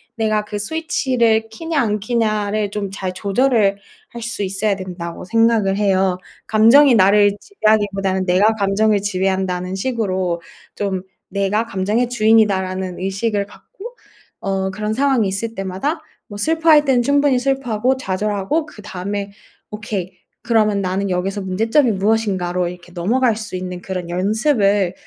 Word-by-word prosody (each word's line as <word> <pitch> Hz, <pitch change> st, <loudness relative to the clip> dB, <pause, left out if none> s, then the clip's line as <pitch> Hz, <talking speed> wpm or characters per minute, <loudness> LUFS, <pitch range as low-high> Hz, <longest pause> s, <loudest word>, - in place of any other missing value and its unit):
내가 215 Hz, -2 st, 0 dB
그 210 Hz, 0 st, -6 dB
스위치를 235 Hz, -4 st, 0 dB
켜냐 325 Hz, +6 st, -2 dB
안 210 Hz, -2 st, 0 dB
켜냐를 215 Hz, -2 st, -1 dB
좀 205 Hz, -2 st, -3 dB
잘 190 Hz, -1 st, -5 dB
조절을 200 Hz, +1 st, +1 dB, 0.3 s
할 235 Hz, -, -9 dB
수 235 Hz, -2 st, -4 dB
있어야 195 Hz, +1 st, 0 dB
된다고 180 Hz, -3 st, -7 dB
생각을 225 Hz, -1 st, +2 dB
해요. 190 Hz, -2 st, +2 dB, 0.3 s
감정이 235 Hz, +5 st, +6 dB
나를 205 Hz, +1 st, +4 dB
지배하기보다는 200 Hz, -, 0 dB
내가 195 Hz, +5 st, +3 dB
감정을 205 Hz, +1 st, +1 dB
지배한다는 190 Hz, -2 st, -1 dB
식으로 190 Hz, -6 st, -1 dB, 0.3 s
좀 190 Hz, -2 st, -2 dB, 0.3 s
'내가 200 Hz, +3 st, 0 dB
감정의 215 Hz, +4 st, 0 dB
주인이다.'라는 195 Hz, -5 st, +2 dB
의식을 200 Hz, +2 st, -1 dB
갖고 440 Hz, -, -12 dB, 0.4 s
어 190 Hz, -1 st, -2 dB
그런 210 Hz, +2 st, -3 dB
상황이 265 Hz, -4 st, +2 dB
있을 200 Hz, +4 st, -3 dB
때마다 195 Hz, -, -3 dB, 0.3 s
뭐 205 Hz, -, -9 dB
슬퍼할 320 Hz, +2 st, +4 dB
때는 255 Hz, -3 st, +3 dB
충분히 280 Hz, -1 st, +3 dB
슬퍼하고 260 Hz, -2 st, 0 dB
좌절하고 210 Hz, -, -1 dB
그다음에 200 Hz, -5 st, -6 dB, 0.4 s
'오케이 210 Hz, -3 st, -5 dB, 0.3 s
그러면 215 Hz, -4 st, +2 dB
나는 190 Hz, +1 st, -1 dB
여기서 190 Hz, +3 st, -2 dB
문제점이 225 Hz, +8 st, +1 dB
무엇인가?'로 190 Hz, -4 st, 0 dB
이렇게 175 Hz, 0 st, -10 dB
넘어갈 225 Hz, +7 st, +1 dB
수 215 Hz, -4 st, -6 dB
있는 180 Hz, -1 st, -5 dB
그런 180 Hz, -2 st, -5 dB
연습을 200 Hz, -, +1 dB
205 Hz, 335 characters per minute, -19 LUFS, 190-230 Hz, 0.4 s, 감정이